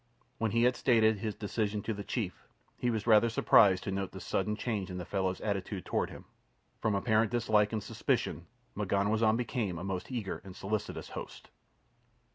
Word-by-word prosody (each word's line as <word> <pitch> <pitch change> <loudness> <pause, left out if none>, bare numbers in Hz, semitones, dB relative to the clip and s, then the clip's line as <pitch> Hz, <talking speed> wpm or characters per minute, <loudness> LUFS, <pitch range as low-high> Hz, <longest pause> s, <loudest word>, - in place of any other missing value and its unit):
When 110 - +1
he 115 +3 +2
had 125 +1 +4
stated 110 -4 +3
his 105 0 -3
decision 105 0 -2
to 115 - -2
the 100 -1 -6
chief 100 -4 -4 0.3
he 125 - -1
was 110 -3 -1
rather 115 0 +6
surprised 100 -3 +5
to 105 - -3
note 95 -1 -3
the 95 - -7
sudden 95 +3 -1
change 105 -4 -2
in 90 - -5
the 90 - -5
fellow's 95 0 -1
attitude 100 -2 -3
toward - - 0
him. - - -11 0.5
From 110 -2 +1
apparent 110 +2 +2
dislike 110 -3 +2
and 110 -2 -2
suspicion - - -1 0.3
M'ganwazam 110 +3 +2
became 110 -6 -2
a 85 - -6
most 95 +4 -4
eager 115 -6 -3
and 95 -1 -10
solicitous 105 +2 -3
host. - - -8
105 Hz, 180 wpm, -31 LUFS, 95-110 Hz, 0.5 s, rather